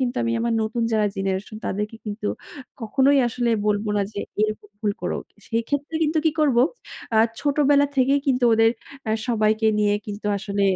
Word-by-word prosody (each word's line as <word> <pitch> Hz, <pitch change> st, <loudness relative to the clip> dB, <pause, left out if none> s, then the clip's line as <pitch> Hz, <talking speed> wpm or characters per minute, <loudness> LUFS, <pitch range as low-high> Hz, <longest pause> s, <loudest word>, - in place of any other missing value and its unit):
কিন্তু 255 Hz, -1 st, -1 dB
আমি 230 Hz, -1 st, 0 dB
আমার 235 Hz, 0 st, 0 dB
নতুন 225 Hz, +2 st, -2 dB
যারা 215 Hz, -1 st, +3 dB
জেনারেশন 195 Hz, +2 st, -2 dB
তাদেরকে 210 Hz, +3 st, -3 dB
কিন্তু 210 Hz, 0 st, -4 dB, 0.5 s
কখনোই 270 Hz, +5 st, +3 dB
আসলে 240 Hz, 0 st, -1 dB, 0.2 s
বলব 210 Hz, 0 st, +1 dB
না -, -, +2 dB
যে -, -, -6 dB, 0.2 s
এরকম 215 Hz, -1 st, -1 dB
ভুল 210 Hz, -2 st, 0 dB
করুক। -, -, -3 dB, 0.2 s
সেক্ষেত্রে 285 Hz, +7 st, -2 dB
কিন্তু 315 Hz, +1 st, +1 dB
কি 320 Hz, -, +4 dB
করবো, 255 Hz, -5 st, +4 dB, 0.5 s
আ -, -, +3 dB, 0.2 s
ছোটবেলা 285 Hz, -1 st, +3 dB
থেকেই 270 Hz, +2 st, +3 dB
কিন্তু 255 Hz, -2 st, +2 dB
ওদের 225 Hz, 0 st, +5 dB, 0.4 s
আ -, -, +1 dB, 0.2 s
সবাইকে 220 Hz, -1 st, +2 dB
নিয়ে 205 Hz, -1 st, +3 dB
কিন্তু 210 Hz, 0 st, -6 dB
আসলে 200 Hz, 0 st, -2 dB
225 Hz, 165 wpm, -23 LUFS, 210-265 Hz, 0.5 s, ওদের